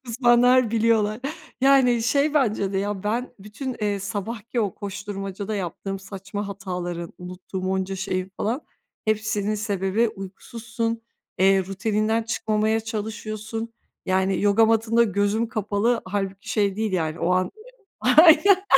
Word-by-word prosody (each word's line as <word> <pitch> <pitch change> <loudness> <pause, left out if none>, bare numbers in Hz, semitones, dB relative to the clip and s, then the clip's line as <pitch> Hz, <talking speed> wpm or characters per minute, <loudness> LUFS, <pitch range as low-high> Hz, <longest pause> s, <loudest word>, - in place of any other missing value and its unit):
uzmanlar 240 0 +4
biliyorlar. 220 -1 +2 0.4
Yani 260 -3 +5
şey 285 +5 +2
bence 215 -8 +1
de 190 - 0
ya 200 -1 -2
ben 235 +5 -2
bütün, 225 +6 -6
eee, 205 -1 0
sabahki 220 +4 -3
o 205 -4 -1
koşturmacada 200 0 -5
yaptığım 195 +1 -4
saçma 195 +1 -6
hataların, 180 -3 -5
unuttuğum 185 +1 -6
onca 190 0 -1
şeyin 185 0 -3
falan, 235 +7 -1 0.4
hepsinin 215 -1 0
sebebi 205 +1 0
uykusuzsun, 225 +4 -5 0.4
eee, 195 0 +4
rutininden 215 +3 0
çıkmamaya 220 -1 0
çalışıyorsun. 220 0 -5 0.3
Yani 190 0 +1
yoga 205 +2 +5
matında 225 +1 +3
gözüm 205 +2 0
kapalı. 215 +2 0
Hâlbuki 195 0 -4
şey 200 -3 +1
değil 220 -2 -1
yani 160 -3 -1
o 175 - +1
an, 185 0 +3
ııı - - -9 0.7
Aynen, 355 +4 +7
210 Hz, 130 wpm, -24 LUFS, 195-230 Hz, 0.7 s, Aynen